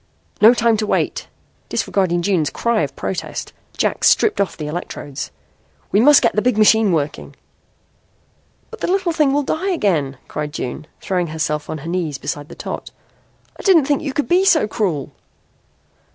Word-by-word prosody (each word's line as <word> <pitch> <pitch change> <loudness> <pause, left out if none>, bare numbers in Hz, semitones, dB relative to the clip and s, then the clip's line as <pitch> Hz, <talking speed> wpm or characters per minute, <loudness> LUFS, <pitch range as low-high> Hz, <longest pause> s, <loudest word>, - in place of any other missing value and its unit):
"No 225 +3 +8
time 230 -2 +2
to 215 0 -2
wait." - - -1 0.4
Disregarding 175 -3 0
June's 175 -5 +1
cry 235 -2 0
of - - -3
protest - - -5 0.2
Jack - - 0
stripped 425 - +4
off 200 - -2
the 155 - -5
electrodes. 150 -3 -6 0.6
"We 200 - +3
must 285 +2 +6
get 230 - +2
the 210 - +2
big 250 -1 +1
machine 215 -1 +5
working." 155 -3 -2 1.4
"But - - -10
the - - -1
little 375 -1 +1
thing 305 -4 +2
will 290 +1 +1
die 335 +8 -2
again," 170 - 0
cried 150 -1 -5
June, 150 +5 -5
throwing 180 -2 -1
herself 155 -1 -3
on 155 - -3
her 155 +2 -9
knees 170 -5 -2
beside 145 +2 -5
the - - -10
tot. - - -6 0.7
"I - - -5
didn't 345 -8 +5
think 285 0 +1
you 290 - -3
could 295 - -1
be 360 +2 +3
so 345 - +4
cruel." 180 - -2
205 Hz, 170 wpm, -19 LUFS, -, 1.4 s, No